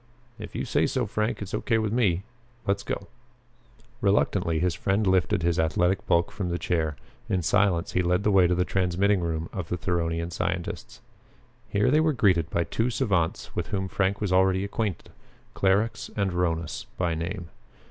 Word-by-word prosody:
"If - - -8
you - - -2
say - - +2
so, - - 0
Frank, 110 0 -2
it's 100 - -9
okay 115 - +1
with 110 -1 -1
me. 100 -7 +2 0.4
Let's 100 0 +1
go!" 100 - -4 1.0
Reluctantly 100 -4 +2
his 90 +1 +1
friend 100 +4 0
lifted 90 -3 +2
his 85 -1 +1
athletic 90 +4 +1
bulk 85 0 +2
from 95 -3 -3
the 85 - -1
chair. 80 -4 -1 0.3
In 90 -2 0
silence 95 0 +2
he 90 - +1
led 90 +2 +1
the 105 - +3
way 95 -2 +5
to 90 - +1
the 90 +1 +1
transmitting 95 +2 +1
room 80 -1 -2
of 90 -4 -5
the 90 - -1
Theronian 85 -1 -1
scientists. 85 +1 -4 0.7
Here 105 +5 +2
they 150 - +5
were 155 -1 +3
greeted 90 - +2
by 85 - +1
two 115 +7 -1
savants 100 -10 -1
with - - -2
whom 95 -2 -2
Frank 95 +1 0
was 100 -3 0
already 95 0 +3
acquainted, 100 -2 -3 0.4
Clarux 100 +4 +1
and 100 -2 +1
Rhonus 85 -4 -2
by 90 -2 0
name. 85 +2 -4
95 Hz, 180 wpm, -26 LUFS, 85-100 Hz, 1.0 s, way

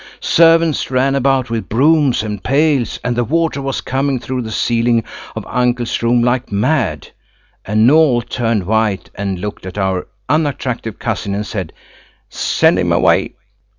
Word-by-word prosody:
Servants 165 -2 +3
ran 130 +1 +1
about 135 -2 +1
with 115 -1 -3
brooms 140 -1 +3
and 105 -2 -5
pails, 140 -2 +1
and 125 -1 -1
the 120 - +1
water 160 +2 0
was 135 0 -3
coming 135 +1 -1
through 125 +2 -4
the 110 - -6
ceiling 115 0 +1 0.3
of - - -5
uncle's 125 -1 -1
room 120 0 +2
like 125 0 0
mad, 105 - 0 0.6
and 110 +3 +3
Noël 140 -5 +4
turned 115 -5 -1
white 110 -1 0
and 100 -2 -3
looked 105 +3 -6
at 95 - -8
our 95 -2 -1 0.2
unattractive 130 -7 -1
cousin 100 -3 -3
and 105 +1 -3
said: 95 -7 -5 0.6
"Send - - +2
him - - 0
away." - - +2
120 Hz, 150 wpm, -16 LUFS, 110-135 Hz, 0.6 s, Noël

